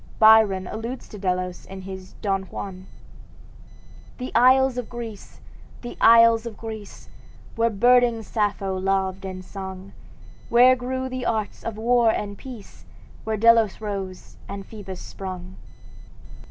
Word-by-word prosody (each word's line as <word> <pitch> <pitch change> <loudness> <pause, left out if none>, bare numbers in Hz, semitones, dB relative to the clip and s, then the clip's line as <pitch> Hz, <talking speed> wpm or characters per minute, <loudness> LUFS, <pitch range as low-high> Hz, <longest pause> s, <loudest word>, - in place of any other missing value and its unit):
Byron 215 -4 +6
alludes 230 +6 -6
to 210 - -10
Delos 180 -1 -2
in 190 0 -8
his 190 0 -9
"Don 195 -2 0
Juan": 185 0 -8 1.3
"The 255 0 -5
isles 255 +1 +4
of 245 - -6
Greece! 230 -4 -9 0.4
the 240 - -7
isles 230 0 +6
of 225 - -8
Greece! 220 -3 -9 0.5
Where 230 0 +2
burning 240 +1 +3
Sappho 205 -3 -1
loved 190 0 -1
and 185 -1 -7
sung, 190 0 -8 0.6
Where 250 +2 +6
grew 260 +1 -3
the 255 -1 -4
arts 215 -2 -2
of 225 -2 -5
war 235 +1 +3
and 205 -2 -2
peace, 235 -2 -11 0.4
Where 220 0 -1
Delos 230 -1 +4
rose 195 -3 -6
and 200 0 -6
Phoebus 195 -4 -9
sprung!" 185 -1 -8
215 Hz, 130 wpm, -24 LUFS, 190-235 Hz, 1.3 s, Byron